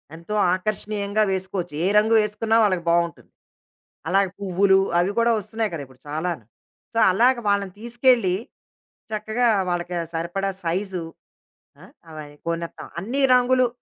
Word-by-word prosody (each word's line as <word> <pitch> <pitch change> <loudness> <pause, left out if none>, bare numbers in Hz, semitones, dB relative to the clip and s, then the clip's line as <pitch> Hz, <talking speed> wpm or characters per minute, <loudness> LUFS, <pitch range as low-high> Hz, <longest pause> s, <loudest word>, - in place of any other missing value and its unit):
ఎంతో 170 +6 -7 0.2
ఆకర్షణీయంగా 205 +2 -1
వేసుకోవచ్చు. 190 -3 -3
ఏ - - +3
రంగు 220 +2 +4
వేసుకున్నా 215 +2 0
వాళ్ళకి 185 -4 +1
బాగుంటుంది. 170 -1 0 0.8
అలాగే 195 0 +3
పువ్వులు 190 0 +3 0.2
అవి 185 +3 +1
కూడా 235 0 +3
వస్తున్నాయి 220 +1 -3
కదా 155 - -4
ఇప్పుడు 130 0 -21
చాలాను. 155 - -3 0.5
సో, 230 - +1
అలాగ 245 +7 +4
వాళ్ళని 200 -2 0
తీసుకెళ్లి 235 -5 +2 0.8
చక్కగా 220 +3 0 0.2
వాళ్ళకి 175 0 -2
ఆ - - -3
సరిపడా 175 +4 -2
సైజు. 180 +1 -2 0.8
ఆ! - - -13 0.3
అవి 155 -1 -8 0.2
కొనేత్తాం. 170 0 -4
అన్నీ 255 +8 -2
రంగులు, 250 0 +3
195 Hz, 130 wpm, -23 LUFS, 175-220 Hz, 0.8 s, రంగు